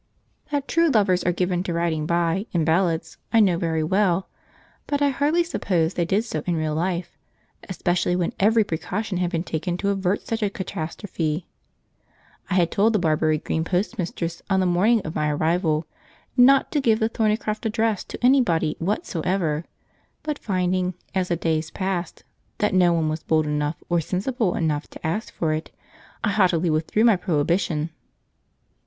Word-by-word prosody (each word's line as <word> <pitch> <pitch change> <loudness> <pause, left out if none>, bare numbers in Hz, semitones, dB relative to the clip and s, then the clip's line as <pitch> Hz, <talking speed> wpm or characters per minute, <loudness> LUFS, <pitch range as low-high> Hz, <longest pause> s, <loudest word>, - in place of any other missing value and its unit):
That 285 -1 -2
true 335 0 +3
lovers 195 -7 +3
are 175 - +3
given 180 0 0
to 180 -2 -3
riding 165 -2 -1
by, 170 +4 0
in 165 -3 +1
ballads, 165 0 +1
I 230 - +5
know 185 -5 +4
very 160 -3 0
well, 190 +1 +1 0.6
but 285 - 0
I 285 0 +3
hardly 295 +6 +2
supposed 175 - 0
they 170 - +1
did 200 +6 +1
so 155 -9 -3
in 175 - +1
real 155 -1 -1
life, 175 +1 -2 0.5
especially 180 -1 0
when 175 -2 -1
every 220 +3 +4
precaution 195 +2 -3
had 180 -1 +1
been 165 -1 -2
taken 175 +1 -3
to 200 +2 -1
avert 195 0 0
such 225 0 -2
a 205 - +1
catastrophe. 170 -3 -4 1.0
I 185 - 0
had 175 -3 +3
told 220 +3 +3
the - - +4
Barbury 155 -2 +2
Green 160 +1 -2
postmistress, 175 -2 -2
on 190 -1 +3
the 185 - +2
morning 200 +6 +3
of 155 - -6
my 150 0 0
arrival, 160 +1 +1 0.5
not 265 +2 +5
to 295 - +1
give 225 -4 +3
the 220 - +2
Thornycroft 215 -1 -1
address 220 -2 0
to - - -7
anybody 175 - +3
whatsoever, 170 -3 -1 0.6
but 300 -1 -3
finding, 185 -2 0 0.2
as 185 -2 0
the 175 - 0
days 160 -1 -1
passed, 185 -3 -3 0.3
that 210 -2 +1
no 180 -2 +5
one 165 -2 +1
was 155 +1 -2
bold 155 -1 +1
enough 150 +1 -2
or 170 -1 +1
sensible 200 - -1
enough 155 -3 -1
to - - -11
ask 170 +8 -2
for 160 -2 -1
it, 155 +1 -4 0.5
I 205 - +2
haughtily 180 -5 +2
withdrew 160 +8 +1
my 225 -5 +5
prohibition. 165 -1 0
180 Hz, 170 wpm, -23 LUFS, 165-210 Hz, 1.0 s, I